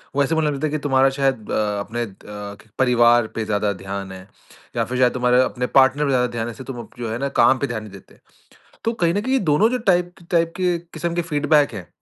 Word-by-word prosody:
वो 140 - +3
ऐसे 160 +4 0
बोलने 155 -2 +1
लगते 145 +2 -2
है - - -5
कि 155 - 0
तुम्हारा 135 -1 +3
शायद 135 -6 0
अ, - - -2 0.3
अपने 115 +4 -3
द 105 +1 -10
परिवार 120 -2 +4
पे 110 -1 -2
ज़्यादा 105 -1 0
ध्यान 95 0 -6
है, 95 +1 -11 0.5
या - - +1
फिर 125 - -4
शायद 125 -1 +4
तुम्हारे 125 0 +3
अपने 125 0 -2
पार्टनर 135 +3 +4
पे - - 0
ज़्यादा 125 -1 +2
ध्यान 115 0 -2
है 120 - -5
जिससे 130 - -10
तुम 120 - -8
जो 115 -2 -3
है 115 - -3
ना 140 0 -1
काम 130 +3 +5
पे 140 - -1
ध्यान 110 -3 -4
नहीं 105 - -11
देते। 95 - -15 0.7
तो 230 - +1
कहीं 170 +1 +2
न 205 - +1
कहीं 260 +2 +1
दोनों 200 +10 +4
जो 250 - 0
टाइप 175 0 +1 0.2
टाइप 165 -1 +2
के 180 -2 +1 0.2
किस्म 170 -1 -3
के 175 - 0
फ़ीडबैक 150 -3 +2
हैं, 95 -4 -8
130 Hz, 245 wpm, -21 LUFS, 110-155 Hz, 0.7 s, काम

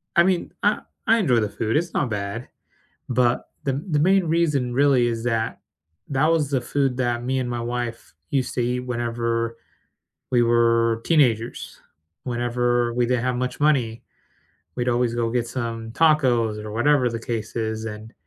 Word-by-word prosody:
I 170 - +7
mean, 185 -1 0
I 205 +1 +3 0.3
I 225 - +5
enjoy 135 - +3
the 105 -2 0
food, 110 +4 -1
it's 170 +2 -2
not 135 - 0
bad, 105 +3 -4 0.6
but 125 -1 +1 0.2
the 135 - +1
m 140 +3 -4
the 150 - +2
main 190 +5 +4
reason, 155 -7 +1
really, 135 -2 +4
is 115 -1 -2
that 115 -2 -1 0.5
that 140 +3 +2
was 155 -4 +1
the 135 -3 +1
food 135 +1 0
that 120 -2 0
me 130 +1 0
and 125 -1 -2
my 120 -1 -3
wife 120 -3 -4 0.2
used 135 -3 -1
to - - -1
eat 125 +1 0
whenever 115 -1 -2 0.8
we 120 - +4
were 115 -1 +3
teenagers, 120 -8 +1 0.4
whenever 120 -1 0
we 120 0 +2
didn't 125 0 0
have 125 -1 0
much 125 +1 -3
money, 130 -7 +1 0.7
we'd 125 0 -1
always 120 -1 +1
go 115 -1 0
get 120 0 0
some 115 -2 -4
tacos, 120 -8 +2
or 105 - -6
whatever 125 +3 +3
the 115 -1 -4
case 115 -1 -4
is, 110 -1 -2
and, 110 +1 -8
120 Hz, 175 wpm, -23 LUFS, 115-135 Hz, 0.8 s, I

